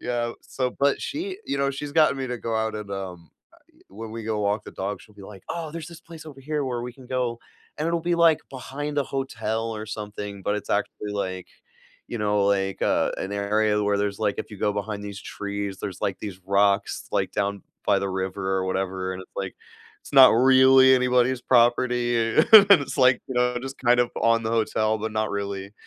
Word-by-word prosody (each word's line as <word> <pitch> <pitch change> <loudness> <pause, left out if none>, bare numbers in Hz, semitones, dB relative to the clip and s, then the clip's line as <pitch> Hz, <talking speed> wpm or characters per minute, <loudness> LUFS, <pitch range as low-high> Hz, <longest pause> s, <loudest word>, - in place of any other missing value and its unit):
yeah, 120 -1 -2
so, 125 -1 -3
but 140 0 +2
she, 370 +6 -4
you - - -2
know, 140 0 +1
she's 140 +1 -6
gotten 155 -3 +4
me 130 - -3
to 125 - -3
go 115 -1 -3
out 110 0 -1
and, 105 -2 -6
um, 90 -4 -7 0.4
a - - -32
i - - -24
when 110 +3 -9
we 115 0 -6
go 110 -1 -2
walk 105 +1 0
the - - -9
dog, 100 +2 -4
she'll 105 - -19
be 100 - -15
like, 95 -1 -12
"Oh, 165 -3 -4
there's 165 -1 -7
this 170 -1 -12
place 165 -1 -12
over 135 -3 -11
here 150 +1 -2
where 125 -2 -3
we 125 0 -6
can 130 -1 -15
go." 125 -2 -2 0.4
and 155 - -1
it'll 170 0 0
be, 170 +1 0
like, 165 -2 +5
behind 145 +3 -5
a 140 - +1
hotel 115 -4 -3
or 110 - -6
something, 105 -2 -6
but 105 +2 0
it's - - -7
actually, 105 0 -2
like, 95 -3 -4 0.6
you 120 - -4
know, 105 -1 +1
like, 95 -1 0
uh, - - +1
an 95 - -4
area 105 +1 +1
where 100 -1 +1
there's, 100 0 -2
like, 105 -2 0
if - - -5
you 105 - -9
go 105 - +1
behind 105 0 -4
these 100 0 -7
trees, 100 -1 -5
there's, 95 -3 -6
like, 95 - -2
these 95 -3 -7
rocks, 100 +1 +1
like, - - 0
down 100 -1 -2 0.2
by 100 - +3
the 100 - -2
river 95 0 -2
or 95 - -1
whatever, 95 0 -2
and 95 - -7
it's, - - -19
like, - - -4 0.5
it's - - -15
not 135 -2 +9
really 130 +2 +6
anybody's 125 0 +2
property, 120 0 +2
a 115 +2 0
and 210 -2 +11 0.2
it's, 140 - -6
like, 130 -1 +4
you 130 - -5
know, 125 0 +1
just, 135 +1 -7
kind 120 -1 +3
of, 120 - +1
on 115 0 +3
the 110 - -2
hotel, 110 -1 +1
but 110 0 -4
not 110 0 -1
really, 100 -1 -4
110 Hz, 225 wpm, -24 LUFS, 100-130 Hz, 0.6 s, and